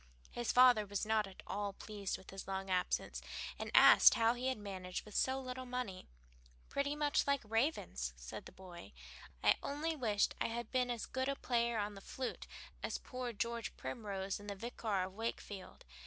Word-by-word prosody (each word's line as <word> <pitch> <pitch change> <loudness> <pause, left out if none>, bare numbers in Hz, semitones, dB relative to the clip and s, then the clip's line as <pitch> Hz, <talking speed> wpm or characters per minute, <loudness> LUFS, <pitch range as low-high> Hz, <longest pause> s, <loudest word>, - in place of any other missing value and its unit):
His 240 -1 -1
father 250 -3 +7
was 205 0 -2
not 215 -1 +2
at 190 - -12
all 205 0 -2
pleased 205 -1 -4
with 190 - -13
his 195 -1 -7
long 195 0 -3
absence, 180 -1 0 0.4
and - - -3
asked - - +9
how 230 0 +4
he 250 +1 -3
had 260 - 0
managed 190 -3 -5
with 210 - -11
so 265 +1 +2
little 255 0 -5
money. 245 -7 -4 0.6
"Pretty 285 +1 0
much 295 -1 +2
like 280 -2 +2
the 210 - -19
ravens," 225 - 0
said - - -8
the - - -11
boy. 180 -2 -11 0.5
"I - - +6
only 310 +3 -2
wished 215 -7 +2
I - - +2
had 235 +1 -4
been 250 -1 +2
as 240 -2 -2
good 260 +1 -1
a 275 - 0
player 235 -3 +1
on 205 0 -1
the 195 - -10
flute 255 +5 -5 0.3
as - - -2
poor 250 -1 -5
George 235 +1 -3
Primrose 195 - -3
in 205 - -11
'The 200 - -3
Vicar 215 -2 -2
of 185 0 -5
Wakefield.' 205 -3 -5
220 Hz, 190 wpm, -36 LUFS, 195-250 Hz, 0.6 s, asked